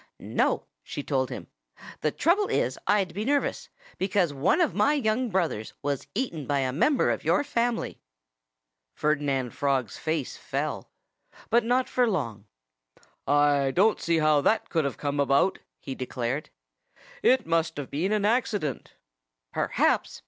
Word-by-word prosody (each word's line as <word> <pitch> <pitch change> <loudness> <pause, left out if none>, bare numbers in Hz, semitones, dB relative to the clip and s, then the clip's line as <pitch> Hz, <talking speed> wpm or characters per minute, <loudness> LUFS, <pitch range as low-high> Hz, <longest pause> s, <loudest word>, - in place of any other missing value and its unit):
"No!" - - 0 0.2
she 145 - -6
told 130 -3 0
him. - - -6 0.5
"The 155 - +1
trouble 360 - +2
is - - 0
I'd 195 -5 +2
be 205 - -3
nervous, 285 +4 0 0.3
because 185 -5 +1
one 145 - +2
of 345 - +2
my 295 - +3
young 240 -2 0
brothers 170 - -1
was 140 -1 -2
eaten 170 - -2
by 140 -1 +1
a 130 -1 -1
member 260 - +3
of - - -3
your - - +2
family." 240 -3 -1 0.9
Ferdinand 140 -4 0
Frog's 135 -6 -1
face 160 -4 -2
fell. - - -3 0.6
But 235 +1 +4
not 250 +2 +1
for 245 -2 +2
long. 115 - -3 0.8
"I 145 -1 +3
don't 200 +10 +3
see 170 -1 +1
how 155 -2 +4
that 220 +10 +1
could 160 -4 +1
have 140 - -3
come 145 0 -2
about," 140 +6 +3 0.2
he 135 - -6
declared. 130 +2 -3 0.7
"It 255 -2 +4
must 165 -1 0
have 145 -2 -6
been 170 +8 -1
an 210 -1 +1
accident." 210 - -1 0.6
"Perhaps!" - - +1
160 Hz, 150 wpm, -27 LUFS, 140-220 Hz, 0.9 s, But